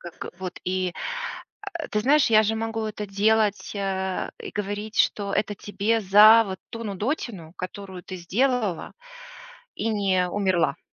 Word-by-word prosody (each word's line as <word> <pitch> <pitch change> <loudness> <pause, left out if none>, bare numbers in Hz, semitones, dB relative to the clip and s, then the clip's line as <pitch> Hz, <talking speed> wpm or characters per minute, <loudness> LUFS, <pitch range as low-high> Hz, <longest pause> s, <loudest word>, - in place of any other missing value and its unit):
как 175 -1 -8
вот 185 -1 -6
и, 185 -1 -1 0.8
а, 330 - -4
ты 210 - 0
знаешь, 280 +6 +4
я 215 0 +7
же 220 +1 0
могу 225 0 -2
это 210 -1 -5
делать, 210 +1 +1
а, 190 -1 -2
и - - -7
говорить, 210 +1 -4
что 200 -1 +2
это 205 0 0
тебе 210 +3 -1
за 215 +3 +8
вот 190 -2 -6
ту 230 0 -6
нудотину, 205 - -3
которую 190 0 -7
ты 185 - -7
сделала 210 +1 0 0.8
и - - -2
не 195 -4 +1
умерла. 190 -3 +1
205 Hz, 150 wpm, -25 LUFS, 190-220 Hz, 0.8 s, за